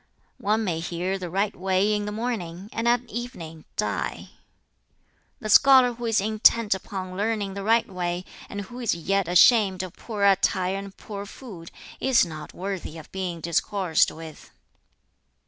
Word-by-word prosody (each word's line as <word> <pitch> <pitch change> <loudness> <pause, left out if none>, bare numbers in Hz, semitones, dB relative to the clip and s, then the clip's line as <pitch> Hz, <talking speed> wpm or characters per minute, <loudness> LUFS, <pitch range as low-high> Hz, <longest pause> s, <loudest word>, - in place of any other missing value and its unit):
"One 215 +2 +1
may 175 -6 -1
hear 180 +3 -3
the 180 -2 -5
right 195 +4 0
way 190 +3 +1
in 210 0 -1
the 210 - -3
morning, 210 -5 -4
and 230 +1 -1
at 240 +1 +2
evening 180 -10 -7
die. - - -2 1.1
"The 215 - -6
scholar 255 +2 +7
who 240 0 -7
is 225 -1 +3
intent 215 +1 +3
upon 185 -1 -6
learning 205 -1 -1
the 200 - -5
right 225 +3 +3
way, 180 -1 -3 0.2
and 205 - -5
who 240 +6 -9
is 235 -8 0
yet 195 +2 0
ashamed 190 +1 +5
of 185 -2 -7
poor 210 -4 -5
attire 190 -1 +3
and 200 0 -8
poor 205 -1 -7
food, 195 -9 -10 0.3
is 260 -7 +4
not 155 -3 -8
worthy 185 -4 -5
of 160 - -12
being 180 -3 -4
discoursed 170 +1 +1
with. 160 -1 -11
195 Hz, 160 wpm, -25 LUFS, 180-220 Hz, 1.1 s, scholar